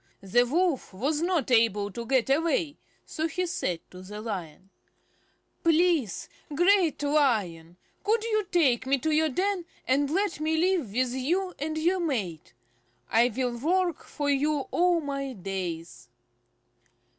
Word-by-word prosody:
The 245 +6 +3
Wolf 320 - 0
was 290 +9 -1
not 340 -6 0
able 210 -4 +3
to 235 +4 -6
get 260 -2 +2
away, 310 0 +1 0.3
so 315 0 -2
he 360 +3 -2
said 185 - -2
to 180 - -10
the 205 +3 -8
Lion: 190 -4 -6 0.9
"Please, 330 - +2 0.3
Great 350 -2 +3
Lion, 210 - +1 0.3
could 440 +2 +1
you 430 -2 0
take 265 -8 +2
me 275 +1 +3
to 310 +5 -1
your 310 +1 +3
den, 375 +5 -1 0.2
and 275 +2 +2
let 390 +2 0
me 315 +1 0
live 345 - +1
with 250 +2 0
you 350 +9 -1
and 310 +2 -3
your 350 +4 +1
mate? 200 - -3 0.6
I 235 +2 +4
will 245 +1 -2
work 340 +5 0
for 290 -2 -4
you 285 +1 +1
all 350 -1 +3
my 275 -2 -4
days." 170 - -6
285 Hz, 145 wpm, -27 LUFS, 225-335 Hz, 0.9 s, I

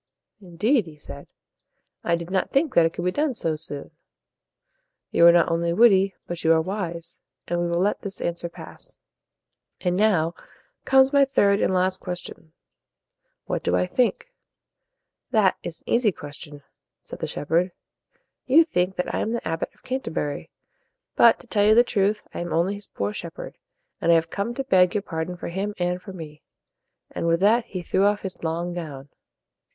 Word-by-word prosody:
"Indeed," 195 +5 +1
he 155 -2 -12
said, 140 -1 -11 0.8
"I 170 - +2
did 170 +1 -7
not 190 -1 0
think 275 0 +1
that 165 -1 +5
it 165 - -7
could 175 - -4
be 180 - +2
done 290 +3 0
so 165 -7 -1
soon. 145 -2 -6 1.2
You 170 - +6
are - - +10
not 170 -1 +3
only 170 0 0
witty, 195 -2 +5
but 175 -1 -6
you 160 - +4
are 160 - +3
wise, 170 -2 -5 0.3
and 175 0 -1
we 175 - 0
will 170 0 0
let 200 +3 0
this 200 -1 -7
answer 170 0 -3
pass. - - -13 0.8
And 180 -1 0
now 180 -5 +2 0.5
comes 265 +1 +5
my 280 -1 +6
third 200 -7 +2
and - - +2
last 185 0 +1
question: 180 -3 -7 0.9
What - - -2
do 90 - 0
I 90 0 +2
think?" 255 - -1 1.0
"That 215 -6 +3
is 160 -2 -6
an - - -14
easy 235 -3 +3
question," 145 -2 -10 0.4
said - - -11
the - - -3
shepherd. 170 +5 0 0.8
"You 300 +6 +7
think 185 - -1
that 180 - -3
I - - 0
am 225 - -1
the 235 - -3
Abbot 165 0 -2
of - - -30
Can 260 +1 -2
ter - - -6
bur 145 -2 -2
y. - - -10 0.7
But, 230 -1 +6
to - - -18
tell 210 -3 +1
you 215 +1 +5
the 240 - +7
truth, 210 -2 0
I - - -5
am 175 -1 -4
only 170 +4 +1
his 205 0 -9
poor 100 +1 -3
shepherd, - - -7 0.5
and 170 - +3
I - - +7
have 165 0 +1
come 210 +4 -3
to 270 - -2
beg 185 -8 +3
your 205 - 0
pardon 165 0 -4
for - - -6
him 200 +4 -3
and 180 0 -1
for 195 - -9
me." 155 -5 -10 0.7
And - - -3
with 165 0 +2
that, 225 +4 +4
he 185 -2 -6
threw 190 +3 +1
off 205 0 +2
his 190 -3 -7
long 170 +2 -2
gown. 145 -5 -7
180 Hz, 195 wpm, -24 LUFS, 165-210 Hz, 1.2 s, are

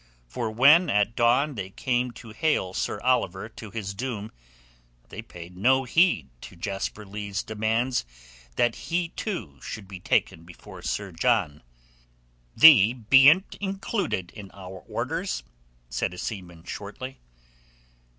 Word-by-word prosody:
For 110 - -4
when 140 +10 +6
at 105 +2 +1
dawn 125 +5 +3
they 100 -6 -5
came 125 +4 -1
to 115 - -12
hale 110 -7 0
Sir 100 - -2
Oliver 115 -6 0
to 110 -1 -10
his 100 -2 -5
doom, 110 -1 -5 0.8
they 110 - -7
paid 90 -5 -12
no 130 +8 +3
heed 130 - +2
to - - -11
Jasper 95 +4 -4
Leigh's 100 0 -4
demands 110 - 0 0.5
that 120 -1 +2 0.2
he, 170 0 0
too, 110 - -5
should 105 -3 -7
be 95 -1 -9
taken 80 - 0
before 85 0 -13
Sir 100 -2 -3
John. 90 -5 +1 0.9
"Thee 125 -9 +8
bean't 135 - +5
included 195 - -2
in 105 -3 -10
our 95 -1 -9
orders," - - -3 0.4
said 90 - -2
a - - -12
seaman 90 -5 -6
shortly. 105 +8 -7
110 Hz, 130 wpm, -26 LUFS, 95-130 Hz, 0.9 s, Thee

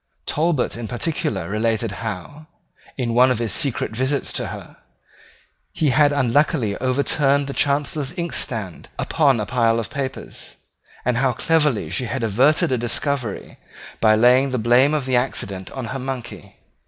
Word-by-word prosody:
Talbot 155 -4 0
in 115 -1 -5
particular 115 - -2
related 110 +1 -1
how, 115 - -6 0.5
in 120 -3 -1
one 125 +2 +5
of 125 - +1
his 115 -4 +1
secret 135 -6 +2
visits 130 +4 -1
to - - -2
her, - - -9 1.0
he 150 -4 +1
had 145 +3 +4
unluckily 130 -5 +1
overturned 140 +2 +2
the 140 - -5
Chancellor's 145 0 0
inkstand 115 - -4
upon 140 -7 +2
a 105 - -2
pile 115 -1 +1
of 115 - -5
papers, 135 -2 -6 0.5
and 125 -1 +1
how 130 0 +2
cleverly 150 -4 +1
she 125 - -1
had 115 +2 -3
averted 130 +8 +3
a 125 - +1
discovery 120 -1 -3 0.4
by 110 -1 +5
laying 125 +4 +4
the 130 - -1
blame 125 +6 +3
of 145 -4 -2
the 130 -1 0
accident 100 -7 -2
on 130 -3 -6
her 135 - -4
monkey. 120 - -7
125 Hz, 155 wpm, -21 LUFS, 115-140 Hz, 1.0 s, one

